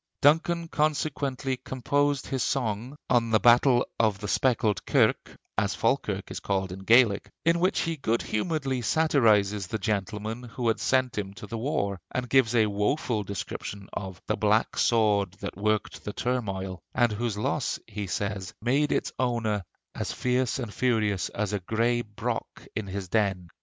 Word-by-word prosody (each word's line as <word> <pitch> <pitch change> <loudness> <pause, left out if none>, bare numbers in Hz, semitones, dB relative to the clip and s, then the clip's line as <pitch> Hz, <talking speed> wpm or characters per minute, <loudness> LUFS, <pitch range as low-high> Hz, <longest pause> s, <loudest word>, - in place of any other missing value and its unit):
Duncan 165 +3 +3
consequently 145 -4 -1
composed 140 +3 0
his 135 -2 -2
song 120 +1 -1
on 120 -2 +2
'The 110 -1 +4
Battle 120 +2 +5
of 110 -3 +3
the 105 - -5
Speckled 110 - +1
Kirk' - - +2 0.2
as - - 0
Falkirk - - 0
is - - -4
called 95 -2 -1
in 95 - -6
Gaelic 110 0 +4 0.2
in 170 +1 +4
which 185 +3 +2
he 165 -1 -2
good 115 -4 0
humoredly 135 +1 -1
satirized 105 - +3
the 110 - -1
gentleman 105 +2 -2
who 120 0 -2
had 110 - 0
sent 130 -4 +1
him 100 -1 -5
to - - -8
the 115 +3 -5
war, 100 -7 -1
and 125 -1 -3
gave 125 -3 +3
a 110 -2 +5
woful 105 +3 0
description 100 0 -6
of 95 -2 -5
'the - - -1
black - - +2
sword 105 -5 +2
that - - -7
worked 105 +2 -1
the 105 - -5
turmoil,' 95 -7 -2
and 120 -2 +3
whose 110 0 -2
loss, 105 - -1
he 105 -1 -5
says, 100 0 -3
made 135 +6 +1
its - - 0
owner 115 -5 0 0.3
'as - - -3
fierce 125 -1 0
and 120 -6 -5
furious 110 -6 +1
as 105 -1 -2
a 105 - 0
gray 115 +5 +1
brock 105 -3 -5
in 105 -1 -3
his 95 0 -4
den.' 95 -3 0
115 Hz, 165 wpm, -27 LUFS, 100-130 Hz, 0.3 s, Battle